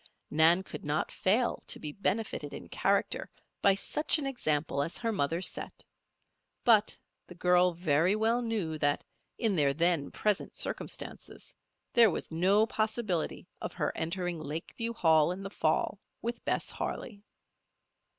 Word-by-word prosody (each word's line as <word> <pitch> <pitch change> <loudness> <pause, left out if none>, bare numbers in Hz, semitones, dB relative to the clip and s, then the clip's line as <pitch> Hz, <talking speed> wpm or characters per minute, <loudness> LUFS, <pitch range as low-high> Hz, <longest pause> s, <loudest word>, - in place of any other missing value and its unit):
Nan 165 +4 +5
could - - -8
not 150 +1 -1
fail 225 +6 +1
to - - -4
be 150 - -5
benefited 205 +6 -2
in - - -9
character - - 0 0.3
by 195 -1 +5
such 300 +11 +1
an 295 - -3
example 155 - 0
as 165 +4 -2
her 230 -1 -1
mother 165 -2 0
set; - - -2 0.8
but 215 -3 +4 0.3
the 180 - -11
girl 180 0 +4
very 170 +2 +2
well 225 +3 +2
knew 205 -10 -2
that, 145 -1 +1 0.3
in 220 -5 +1
their 140 -4 +3
then 170 -2 +2
present 210 -2 -1
circumstances, - - -4 0.4
there 235 -2 +7
was 170 - -3
no 190 +6 +4
possibility 215 -6 -2
of - - -4
her - - -2
entering 175 +1 -2
Lakeview 160 +10 -4
Hall 160 -6 +4
in 190 +2 -5
the 195 - -6
fall - - 0 0.2
with 235 +1 -3
Bess - - 0
Harley. 205 -4 -5
180 Hz, 145 wpm, -30 LUFS, 160-220 Hz, 0.8 s, there